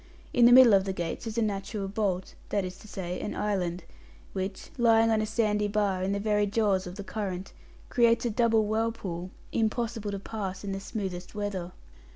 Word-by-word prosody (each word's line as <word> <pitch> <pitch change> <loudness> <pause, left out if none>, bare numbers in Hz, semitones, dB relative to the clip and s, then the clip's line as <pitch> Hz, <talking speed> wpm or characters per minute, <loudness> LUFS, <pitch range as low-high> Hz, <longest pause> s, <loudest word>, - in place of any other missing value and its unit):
In 240 - +6
the - - +6
middle 250 -3 +9
of 195 -1 +5
the 190 - -2
gates 175 +5 -4
is 225 0 -5
a 230 - +3
natural 200 0 -2
bolt 195 -2 -1 0.2
that 200 -2 0
is 180 0 -6
to - - -13
say, 180 -3 -4
an - - -4
island 180 -4 -1 0.5
which, 190 0 -4
lying 225 -1 +5
on 220 -1 +3
a 215 - -1
sandy 210 -1 +1
bar 200 -2 0
in 190 +1 0
the 200 - 0
very 210 0 +2
jaws 200 -3 +1
of 180 - -7
the 200 - -6
current, 195 -2 -4 0.3
creates 235 -1 +3
a 235 - +1
double 225 -1 +3
whirlpool, 210 -5 -2 0.2
impossible 225 -1 -1
to 200 - -3
pass 195 -2 -5
in 200 - -3
the 195 - -3
smoothest 190 -3 -5
weather. 195 -4 -3
205 Hz, 195 wpm, -28 LUFS, 190-220 Hz, 0.5 s, middle